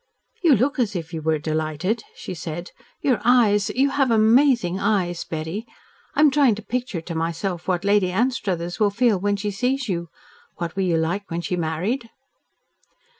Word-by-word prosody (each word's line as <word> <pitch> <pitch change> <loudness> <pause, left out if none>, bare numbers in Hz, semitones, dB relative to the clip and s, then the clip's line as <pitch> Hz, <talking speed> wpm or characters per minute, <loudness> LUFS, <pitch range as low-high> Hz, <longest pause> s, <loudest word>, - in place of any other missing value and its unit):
"You 325 -6 +6
look 265 +6 0
as 215 -5 0
if 165 -1 -5
you 160 - -3
were 160 0 +1
delighted," 155 +8 -2
she - - -7
said. 170 +1 -6 0.3
"Your 260 -5 +1
eyes 225 -4 +4
you 270 +2 +1
have 275 -1 +2
amazing 225 -4 +4
eyes, 190 -4 0
Betty! 165 +8 -5 0.5
I - - +3
am 300 -2 +6
trying 270 -6 +4
to 215 - -9
picture 245 -8 -3
to 165 +1 -6
myself 170 +2 -3
what 185 0 0
Lady 200 -2 +3
Anstruthers 185 -6 -1
will 210 -2 +4
feel 215 -1 +2
when 205 +2 +1
she 205 +1 -3
sees 250 +6 -1
you. 170 -4 -3 0.5
What 170 0 -5
were 195 - -1
you 175 -3 +2
like 175 +5 -2
when 170 +1 -2
she 180 - -2
married?" 180 +9 -2
200 Hz, 175 wpm, -23 LUFS, 170-240 Hz, 0.5 s, You